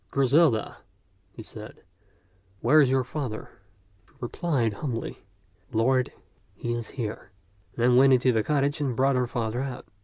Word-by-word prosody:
"Griselda," 135 -3 +2 0.5
he - - -10
said, - - -11 0.8
"where 155 +1 +6
is 135 - +3
your 130 0 +2
father?" 130 -4 -5 0.6
She - - -28
replied 125 -3 -1
humbly, 115 0 -4 0.3
" 95 -2 -37
Lord, 130 +2 +2 0.4
he 120 +4 -3
is 120 -2 -4
here 110 -6 -5 0.2
"; 100 -1 -35
then 125 +1 +4
went 135 +1 +6
into 130 0 +4
the 110 -2 +2
cottage 145 +3 0
and 135 -4 -1
brought 135 +2 +2
her 125 -1 +1
father 120 0 -2
out. 135 -2 -5
125 Hz, 155 wpm, -26 LUFS, 115-135 Hz, 0.8 s, where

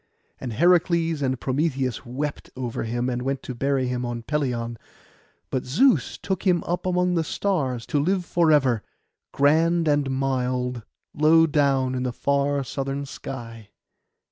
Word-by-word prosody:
And 125 -3 -5
Heracles 170 - +3
and 130 -2 0
Prometheus 135 -3 -1
wept 140 +4 -4
over 125 -3 -3
him, 120 +2 -1
and 125 -1 -2
went 135 +1 -2
to 130 - -5
bury 135 +1 0
him 125 0 -2
on 120 -1 -4
Pelion; 120 -5 -2 0.7
but 130 - -1
Zeus 245 - +2
took 190 -2 -3
him 180 -3 +2
up 175 +1 -2
among 180 0 +1
the 165 -2 +1
stars, 140 -10 -1
to 145 - 0
live 180 +4 +1
for 170 -2 +2
ever, 130 -7 +3 0.5
grand 165 +4 +3
and 145 -2 +2
mild, 125 -2 -1 0.3
low 160 +2 +5
down 140 -4 +2
in 125 - -2
the 125 -1 -1
far 140 +2 0
southern 135 +1 -3
sky. 115 -5 -8
135 Hz, 150 wpm, -24 LUFS, 125-160 Hz, 0.7 s, low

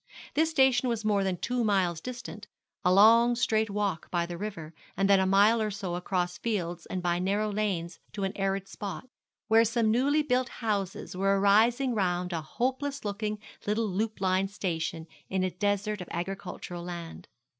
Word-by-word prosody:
This 320 +1 +2
station 265 -5 +3
was 225 -2 -2
more 205 -2 +2
than 190 -2 -1
two 245 +5 -1
miles 185 -6 +1
distant, 245 +3 -7 0.4
a 180 - +4
long, 230 +5 +6
straight 220 -2 +1
walk 200 -5 -2
by 175 -1 0
the 175 0 -6
river, 170 -5 -6 0.2
and 195 +1 +2
then 200 -1 +5
a 190 - +2
mile 205 +4 +5
or 215 - 0
so 195 -3 -4
across 180 0 -2
fields 175 -7 -3
and 185 -1 -4
by 175 0 +1
narrow 205 +3 0
lanes 190 -5 -2
to 200 - -4
an 195 - -2
arid 195 0 -1
spot, 200 +5 -6 0.4
where 225 +1 +6
some 230 -1 +1
newly 285 +6 +2
built 255 -2 +1
houses 200 -5 -3
were 195 +1 +2
arising 230 +6 +4
round 180 -3 0
a 165 - -2
hopeless 265 - -2
looking 210 +1 -2 0.3
little 215 +2 +1
loop 210 +3 -2
line 190 0 +1
station 165 -4 -3 0.2
in 190 -1 0
a 185 - 0
desert 205 +3 -1
of 180 - -7
agricultural 175 -1 -5
land. 170 -2 -7
200 Hz, 175 wpm, -29 LUFS, 180-225 Hz, 0.4 s, long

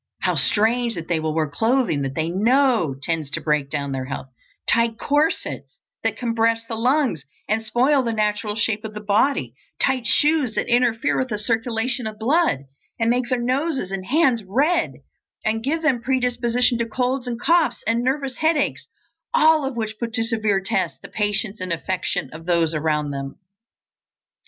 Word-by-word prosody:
How - - +1
strange 230 +2 +2
that 165 -1 -6
they 170 -2 0
will 155 0 -2
wear 160 -1 +1
clothing 225 - +1
that 135 0 -3
they 160 0 0
know 225 - +2
tends 160 -4 -1
to - - -2
break 150 -3 0
down 140 -2 -3
their 130 -1 -3
health; 135 0 -6 0.4
tight 230 -1 +2
corsets 295 +6 -1 0.2
that - - -1
compress 230 -1 +1
the 230 - -6
lungs 245 - +1 0.2
and 220 +1 +1
spoil 260 +5 +3
the 235 -2 -1
natural 210 -1 -1
shape 220 -1 0
of 215 -1 -7
the - - -4
body; 205 - +1 0.3
tight 255 -3 +1
shoes 295 -3 +3
that - - -1
interfere 240 +1 +2
with 260 - 0
the 215 -4 -3
circulation 230 +3 -1
of 215 -1 -7
blood, 260 - +2 0.4
and 230 0 +2
make 245 0 0
their 255 - +1
noses 260 - -1
and 190 -1 -4
hands 265 -6 +3
red, 285 - +1 0.5
and 225 +1 0
give 320 +5 -1
them 265 -6 +2
predisposition 245 -1 +1
to 235 - 0
colds 250 +3 -1
and 235 -1 -3
coughs 320 -5 +2
and 230 +2 +1
nervous 265 0 -1
headaches, 315 -1 0 0.5
all 315 -1 +5
of 270 -2 -3
which 220 -2 -4
put 230 -1 -4
to 225 -1 +1
severe 220 -3 +1
tests 190 0 -1
the - - -12
patience 210 -1 -1
and 185 -1 -3
affection 175 -2 -2
of 165 +2 -10
those 170 -2 +2
around 150 -1 0
them. 135 0 -5
230 Hz, 175 wpm, -22 LUFS, 195-255 Hz, 0.5 s, all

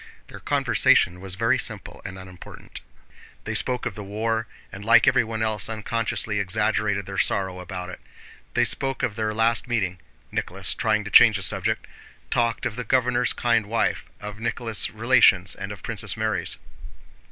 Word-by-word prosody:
Their - - -10
conversation 90 +1 +2
was 95 -1 -2
very 115 +5 +2
simple 105 -3 -3
and 95 -1 -7
unimportant. 95 -2 -11 0.6
They - - -4
spoke 125 -1 0
of 125 - -2
the 105 - -8
war, 110 +3 -2 0.2
and 95 +1 -9
like 110 +1 +5
everyone 110 -1 +2
else 110 -3 0
unconsciously 110 -1 -1
exaggerated 100 0 0
their 95 -1 -4
sorrow 95 -2 0
about 90 0 -6
it; - - -10 0.6
they - - +4
spoke 135 -1 -2
of 105 - -1
their 110 -1 -1
last 115 +2 +1
meeting—Nicholas 95 -3 -4
trying 105 -1 0
to 105 - -8
change - - +7
the - - -4
subject—they - - 0 0.4
talked 120 -1 0
of 120 -2 -3
the 125 - -3
governor's 125 +1 +2
kind 115 -3 +1
wife, 115 +2 0
of 105 0 -8
Nicholas' 115 -1 0
relations, 110 -5 +4
and 95 +1 -6
of 100 -5 -10
Princess - - -3
Mary's. - - -2
110 Hz, 160 wpm, -24 LUFS, 95-115 Hz, 0.6 s, change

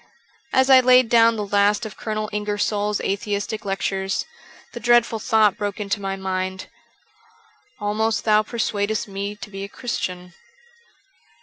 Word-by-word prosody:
As 260 0 +3
I 260 - +9
laid 255 -1 +5
down 230 -1 +5
the 210 -2 -3
last 205 +2 +2
of 215 - -8
Colonel 215 -1 -3
Ingersoll's 210 0 -1
atheistic 205 +2 -3
lectures, 195 0 -2 0.5
the - - -6
dreadful 235 -1 +3
thought 215 -4 +3
broke 205 -1 -3
into 200 0 -2
my 195 0 -3
mind, 190 -1 -3 0.6
* 450 -2 -33
Almost 215 +1 -1
thou 215 -1 +5
persuadest 215 -1 -2
me 200 +1 -5
to 210 +1 -10
be 195 0 -6
a 200 - -7
Christian.' 180 -7 -5
210 Hz, 140 wpm, -22 LUFS, 200-225 Hz, 0.6 s, I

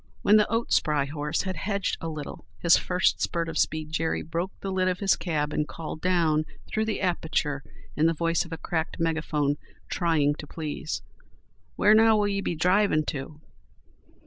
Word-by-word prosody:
When 210 - +6
the 210 - +2
oat 230 +1 0
spry 150 -2 +2
horse 150 +1 -2
had 190 -1 -3
hedged 200 +3 -1
a 165 - -3
little 155 -2 -7
his 170 0 +5
first 180 0 +1
spurt 170 -1 -1
of 165 - -2
speed 155 -1 0
Jerry 160 0 -1
broke 170 +3 -3
the 195 - -4
lid 185 -1 +1
of 180 -1 +1
his 195 0 +3
cab 150 -4 -2
and 150 - 0
called 155 -1 -7
down 165 -4 +2 0.2
through 220 0 -1
the 220 - -2
aperture 160 -5 0 0.3
in 155 +2 +3
the 165 - +3
voice 165 +1 +1
of 170 - -13
a 165 - -4
cracked 160 0 -3
megaphone, 155 -3 0 0.3
trying 160 -4 +2
to 150 - -7
please: 155 0 -4 0.7
"Where, 210 - +5
now, 220 0 +6
will 205 -1 +2
ye 200 -1 -1
be 175 - -2
drivin' 180 0 +3
to?" 150 +2 -6
165 Hz, 185 wpm, -27 LUFS, 155-185 Hz, 0.7 s, When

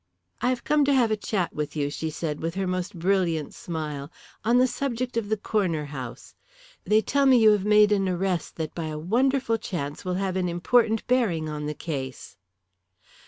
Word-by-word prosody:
"I 250 - +2
have 250 -2 -1
come 300 -1 +3
to 280 - +3
have 240 -4 +3
a - - +3
chat 200 -4 -2
with 150 0 -4
you," 145 -1 -1
she 160 +1 -3
said 150 -1 -4
with 165 +2 -3
her 195 0 -1
most 185 0 -3
brilliant 170 -4 0
smile, 150 -3 -5 0.3
"on 235 +3 +3
the 250 - +5
subject 255 -2 -2
of 225 -3 -1
the 220 - +1
Corner 185 -7 -1
House. 130 -4 -8 0.5
They 215 +1 +4
tell 280 +5 +2
me 260 -1 +7
you 220 -2 +7
have 205 -2 +1
made 210 0 +5
an 195 -2 +2
arrest 180 -1 -1
that 160 -2 -4
by 165 - -4
a 155 -1 -4
wonderful 235 - +1
chance 145 -8 -5
will 180 -1 -2
have 190 0 -1
an 180 -1 0
important 220 +6 +2
bearing 210 -11 +1
on 150 -1 -4
the 150 - -3
case." 135 -6 -6
185 Hz, 200 wpm, -26 LUFS, 155-225 Hz, 0.5 s, me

